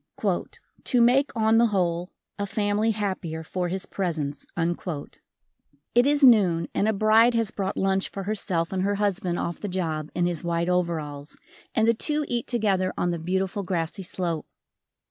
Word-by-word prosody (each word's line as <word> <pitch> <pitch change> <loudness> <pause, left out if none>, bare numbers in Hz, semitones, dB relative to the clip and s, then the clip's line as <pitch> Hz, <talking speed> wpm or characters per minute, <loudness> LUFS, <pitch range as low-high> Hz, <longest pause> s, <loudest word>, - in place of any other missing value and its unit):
"To 250 - +2
make 255 +4 +4
on 220 0 +4
the 235 - +5
whole, 180 -3 0 0.3
a 200 - -1
family 205 +2 0
happier 190 -7 -3
for 180 +2 -2
his 190 +2 -3
presence." 155 -7 -3 1.5
It 245 +3 +5
is 290 0 +2
noon 190 -10 +5
and 205 - +1
a - - +4
bride 220 +3 +4
has 225 -2 +1
brought 195 -2 -3
lunch 195 0 +1
for 195 - -6
herself 190 -4 -1
and 185 - 0
her 200 +2 +1
husband 195 -3 -1
off 170 - -3
the 205 - -4
job 160 -4 -2
in 175 - +1
his 175 -2 -1
white 170 0 0
overalls, 160 -5 -2 0.4
and 220 0 +3
the 230 - +5
two 300 +6 +1
eat 240 -1 -2
together 200 -6 +1
on 175 - +1
the 170 - -3
beautiful 190 +4 -1
grassy 175 -1 -2
slope. 175 -4 -3
190 Hz, 165 wpm, -25 LUFS, 170-215 Hz, 1.5 s, the